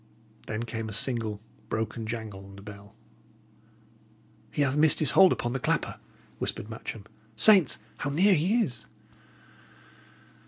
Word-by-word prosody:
Then 110 +1 -3
came 115 -1 -5
a - - -7
single, 110 -1 0 0.3
broken 110 0 -3
jangle 110 -4 -6
on 100 0 -13
the 100 - -12
bell. 100 0 -12 1.5
"He 145 - 0
hath 135 -1 0
missed 155 0 +4
his 150 -3 +4
hold 190 -1 +7
upon 120 0 -1
the 135 - -2
clapper," - - -1 0.4
whispered 105 - -3
Matcham. 110 -2 -7 0.3
"Saints! 160 - +6 0.2
how 140 - -3
near 185 +8 +4
he 190 +9 +2
is!" 120 - -6
115 Hz, 140 wpm, -28 LUFS, 110-150 Hz, 1.5 s, hold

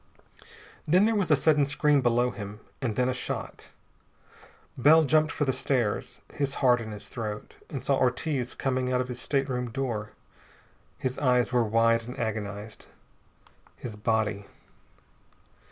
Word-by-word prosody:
Then 180 +6 +5
there 225 - +2
was 200 -6 0
a 150 - +6
sudden 150 0 +3
scream 150 0 +3
below 120 0 +2
him, 105 -1 -8 0.2
and 115 -6 -1
then 125 0 +2
a 130 - +1
shot. 125 - -5 1.1
Bell 155 +5 +6
jumped 155 +2 +3
for 145 - -1
the 130 - +1
stairs, 125 -5 -1
his 140 -1 -1
heart 125 -3 +3
in 110 - -6
his 105 -1 -7
throat, 105 -3 -6 0.2
and 140 - -5
saw 140 - +2
Ortiz 130 0 0
coming 130 -1 -1
out 125 - +2
of 125 0 -2
his 125 0 -5
stateroom 130 -3 -1
door. 115 -4 -3 0.8
His 130 0 -3
eyes 125 -3 +2
were 120 -1 +4
wide 115 +1 +2
and 125 - -7
agonized. 110 -2 -5 0.9
His 115 -4 -7
body.... 105 -1 0
125 Hz, 150 wpm, -27 LUFS, 110-140 Hz, 1.1 s, a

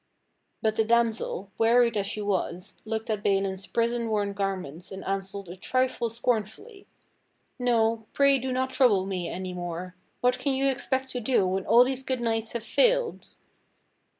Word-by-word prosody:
But 220 -1 +1
the 220 - +4
damsel, 225 -4 0
w^earied 235 +1 +4
as 200 -1 0
she 215 - -3
w^as, 185 -3 -2
looked 220 +1 -3
at 210 -1 -1
Balin's 195 -1 0
prison 235 0 0
worn 205 -2 0
garments 185 -4 -4
and 190 0 -7
answered 195 0 -3
a 175 - -8
trifle 255 +3 0
scornfully. 235 - -3 0.7
"No, 230 -2 +1
pray 280 -1 +4
do 260 +1 -3
not 260 +1 -1
trouble 240 -8 +3
me 185 -3 -3
any 185 0 -5
more. 175 0 -5 0.3
What 250 0 +2
can 280 - 0
you 270 +1 +1
expect 265 0 -2
to 250 - -3
do 240 -4 +2
wdien 185 +1 -1
all 240 +1 +7
these 260 +1 -2
good 260 -1 -2
knights 225 -1 -1
liave 235 -2 -3
failed?" - - +2
225 Hz, 165 wpm, -27 LUFS, 195-250 Hz, 0.7 s, all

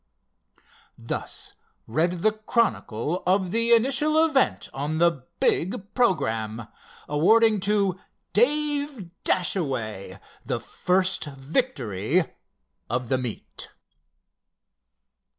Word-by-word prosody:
Thus - - -5 0.3
read 170 +8 0
the 215 - +5
chronicle 200 - -1
of 185 -1 +2
the 230 +2 +1
initial 285 +7 +4
event 280 -5 +1
on 145 +3 -2
the 165 -6 +2
big 190 +3 0
programme, 115 - 0 0.4
awarding 215 +9 +4
to 195 -2 +1 0.3
Dave 285 - +1
Dashaway 125 - -1 0.2
the - - -2
first 185 0 0
victory 135 - 0 0.7
of 120 +1 -2
the 130 - +2
meet. 125 -4 -5
180 Hz, 85 wpm, -25 LUFS, -, 0.7 s, the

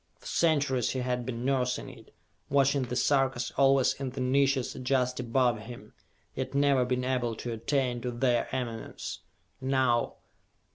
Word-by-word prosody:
For - - -22
centuries 140 -7 +1
he 130 - -2
had 125 -1 -2
been 120 -1 -4
nursing 125 -2 0
it, - - -13 0.4
watching 140 0 +3
the 125 -1 -3
Sarkas 135 -2 +1
always 135 -1 +4
in 135 -1 -4
the 130 +2 -7
niches 135 0 +2
just 125 -1 0
above 125 -1 +1
him, 115 +3 -11 0.4
yet 130 +1 -4
never 140 -2 +3
being 125 0 -1
able 125 -3 -1
to 120 - -5
attain 125 +1 -1
to 125 - -2
their 120 0 +1
eminence. 120 -4 -5 0.4
Now.... 130 -3 +1
130 Hz, 150 wpm, -29 LUFS, 120-135 Hz, 0.4 s, always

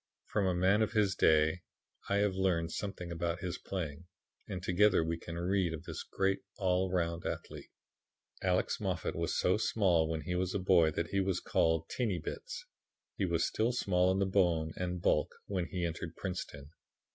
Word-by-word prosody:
From 100 -3 0
a 90 - +1
man 95 +4 +3
of 110 0 +1
his 105 -3 +3
day 80 -1 +3 0.5
I 100 - +2
have 100 -1 +2
learned 90 -3 +1
something 90 -4 -5
about 85 0 -2
his 90 -1 -3
playing, 85 -3 -5 0.4
and 90 -2 -5
together 95 -1 +4
we 80 +1 -1
can 85 0 -7
read 90 -1 +1
of 75 - -10
this - - -6
great 95 0 0 0.2
all 95 -1 +1
round 85 -2 -1
athlete. - - -5 0.7
Alex - - +1
Moffat - - -2
was - - -1
so 90 - +3
small 90 -7 +2
when 80 -1 -2
he 90 - -3
was 90 +1 -1
a - - +1
boy 90 -3 +5
that 85 +2 -2
he 100 - 0
was 95 -2 +1
called 80 -1 +1
"Teeny 110 -8 -1
bits." 75 - -6 0.5
He 95 - 0
was 85 -1 +1
still 115 +3 +1
small 90 -5 +2
in 100 - +2
bone 85 -5 +2
and 90 -1 -3
bulk - - +2
when 90 -3 -2
he 90 -1 -2
entered 85 0 -4
Princeton. 75 -6 -5
90 Hz, 180 wpm, -33 LUFS, 85-95 Hz, 0.7 s, boy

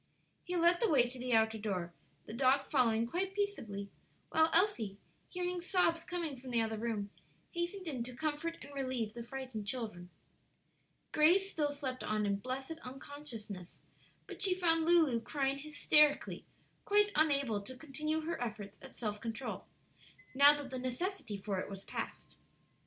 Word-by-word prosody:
He 360 - -3
led 345 +1 +5
the 460 - +3
way 255 -5 +5
to 250 +1 -8
the 250 0 -1
outer 220 0 +3
door, 185 -5 -2 0.3
the - - -7
dog 265 +3 +3
following 230 -5 +3
quite 370 +10 -2
peaceably, 220 - -2 0.4
while 320 0 +5
Elsie, 325 - +2 0.3
hearing 360 -1 -2
sobs 340 -2 +2
coming 330 -7 -3
from 260 - -8
the 240 -1 +2
other 220 -1 0
room, 215 -3 -2 0.4
hastened 345 +2 -3
in 265 -6 -2
to 250 0 -7
comfort 315 +4 -2
and 285 - -10
relieve 255 -5 -2
the 235 0 -6
frightened 245 -4 -6
children. 210 -8 -4 1.0
Grace 365 +6 +4
still 295 -2 +1
slept 275 -3 -4
on 215 0 0
in 200 -1 +1
blessed 265 +8 -4
unconsciousness; 250 - -8 0.5
but - - -9
she 380 -3 +4
found 330 -3 +2
Lulu 320 -9 +4
crying 275 +2 -1
hysterically, 300 0 +3 0.4
quite 415 0 +4
unable 280 -9 +3
to 255 +6 -8
continue 305 +2 -2
her 325 -3 -3
efforts 210 -4 -5
at 270 - -12
self 210 -3 -3
control, 230 +3 -4 0.7
now 285 +2 +7
that 280 -2 -7
the 260 - -3
necessity 255 - -3
for 195 -1 -2
it - - -4
was 195 -1 -8
past. - - -6
270 Hz, 160 wpm, -34 LUFS, 225-325 Hz, 1.0 s, now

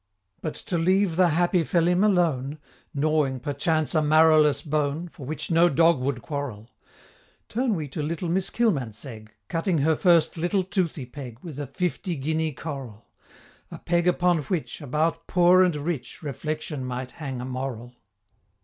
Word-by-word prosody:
But 155 - -4
to 175 - -3
leave 185 +1 +2
the 180 +1 +5
happy 175 +2 +2
Phelim 175 +3 +2
alone, 160 -8 +1 0.3
Gnawing, 145 -2 +1
perchance, 155 +4 -1
a 155 - +3
marrowless 155 -2 +5
bone, 150 +3 -1
For 140 -5 -11
which 155 +3 -4
no 170 +1 +5
dog 165 0 +4
would 125 -1 -2
quarrel 125 -7 -5 0.8
Turn 240 -1 0
we 155 -4 -3
to 155 - -4
little 165 +3 -3
Miss 185 +3 0
Kilmansegg, 125 - -2 0.2
Cutting 165 +1 0
her 155 +2 +3
first 170 -1 +3
little 175 +4 +1
toothy 180 -7 -2
peg 125 -2 -9
With 155 -5 -8
a 145 - -4
fifty 175 +4 -2
guinea 155 +3 -1
coral 135 -7 -7 0.6
A - - -8
peg 175 0 0
upon 180 -1 +3
which 170 -1 -3
About 155 +4 -1
poor 180 +1 +5
and 180 -4 +2
rich 150 0 -4
Reflection 150 0 -4
might 125 0 -4
hang 135 -5 -6
a 125 - -5
moral. 125 -2 -5
155 Hz, 155 wpm, -25 LUFS, 140-175 Hz, 0.8 s, the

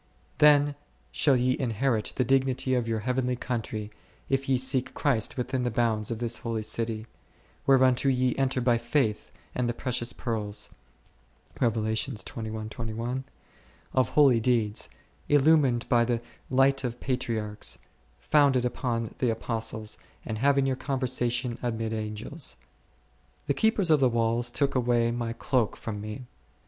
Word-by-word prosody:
Then 145 -1 +6 0.4
shall 140 -4 +3
ye 125 +1 +2
inherit 120 -2 0
the 125 - +2
dignity 130 0 +1
of 120 -2 +1
your 110 -1 -1
heavenly 125 +1 0
country, 110 -4 -4 0.4
if 135 0 0
ye 130 - +4
seek 130 0 0
Christ 125 -6 0
within 130 +1 -1
the 125 - 0
bounds 110 -2 0
of 115 - -2
this 120 0 -2
holy 115 -2 -3
city, 110 0 -2 0.6
whereunto 130 0 +5
ye 130 -1 +1
enter 130 -1 +1
by 120 -1 +3
faith 120 -2 0 0.2
and 125 -1 0
the 120 - -2
precious 120 -1 -1
pearls 105 -4 -4 0.9
2 125 - +4 2.3
of 130 -3 +2
holy 135 -6 +5
deeds, 110 -3 +1 0.4
illumined 145 -4 +4
by 120 -1 +4
the 120 0 0 0.3
light 135 +1 +3
of 120 -1 -3
Patriarchs, 115 -5 -3 0.4
founded 140 -4 +3
upon 115 -3 -2
the 125 - +2
Apostles, 110 -1 -3 0.3
and 110 -1 -4
having 140 +1 +3
your 135 -1 +1
conversation 125 -3 -1
amid 115 -2 -2
Angels. 110 +7 -4 0.9
The 140 - +1
keepers 205 -2 +2
of 155 - +6
the 130 -2 +4
walls 115 +1 +1
took 140 +3 0
away 120 -2 +2
my 120 -1 -2
cloak 120 -2 0
from 105 -2 -5
me. 110 +4 -7
125 Hz, 135 wpm, -27 LUFS, 115-130 Hz, 2.3 s, Then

